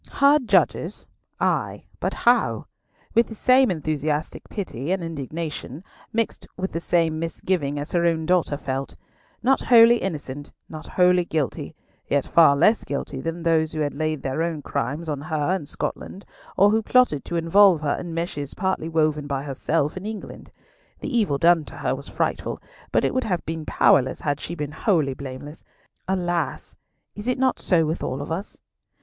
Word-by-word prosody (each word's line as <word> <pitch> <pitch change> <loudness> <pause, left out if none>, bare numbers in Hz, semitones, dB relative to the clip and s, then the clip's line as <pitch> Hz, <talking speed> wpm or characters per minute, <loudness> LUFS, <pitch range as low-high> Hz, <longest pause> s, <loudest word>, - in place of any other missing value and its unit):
Her 285 +2 +5
judges? 250 - +1 0.3
Ay! - - 0 0.2
but - - -2
how? - - +2 0.5
With 230 0 +4
the 220 - -9
same 255 +4 +4
enthusiastic 155 -2 -2
pity 170 - -4
and 190 -2 0
indignation, 155 -1 -5 0.3
mixed 230 0 -2
with 190 +1 -3
the 165 - -2
same 165 -2 +1
misgiving 165 -3 -2
as 145 +2 -5
her 170 -1 +1
own 160 -1 0
daughter 175 -4 +1
felt. 135 -1 -4 0.5
Not 265 +3 +3
wholly 235 -1 +7
innocent, 145 - -5 0.2
not 155 -1 -9
wholly 180 0 +3
guilty, 155 -6 -3 0.3
yet 140 -1 +1
far 160 -4 +6
less 210 +10 +3
guilty 140 -1 -4
than 165 +2 -4
those 160 -2 +2
who 155 - -2
had 145 -1 -1
laid 155 -1 -2
their 135 +4 -2
own 165 -3 -2
crimes 145 +5 -3
on 145 -3 -3
her 155 +3 0
in 160 -7 -5
Scotland, 195 - -5 0.3
or 200 +2 +6
who 220 +1 +2
plotted 235 - +3
to 170 - -4
involve 170 +1 +5
her 145 -2 0
in 175 - -5
meshes 165 -4 -4
partly 190 -4 -1
woven 155 -2 +1
by 140 -1 -2
herself 145 +2 -1
in 185 - -6
England. 220 -2 -8 0.5
The 285 -3 -3
evil 205 -12 +2
done 170 +2 +4
to - - -11
her - - -1
was - - -6
frightful, - - -2 0.3
but - - +2
it - - 0
would 255 - 0
have 180 -5 -2
been 160 -1 -5
powerless 130 -2 +3
had 145 -1 -1
she 170 - -5
been 150 -3 -4
wholly 160 -4 +1
blameless. 140 +3 -9 0.4
Alas! 175 -2 -2 0.4
is 210 +3 -8
it 250 - +1
not 260 0 +1
so 165 -3 +2
with 160 +3 -2
all 130 - -3
of 145 - -8
us? 185 +6 -5
165 Hz, 175 wpm, -23 LUFS, 145-185 Hz, 0.5 s, wholly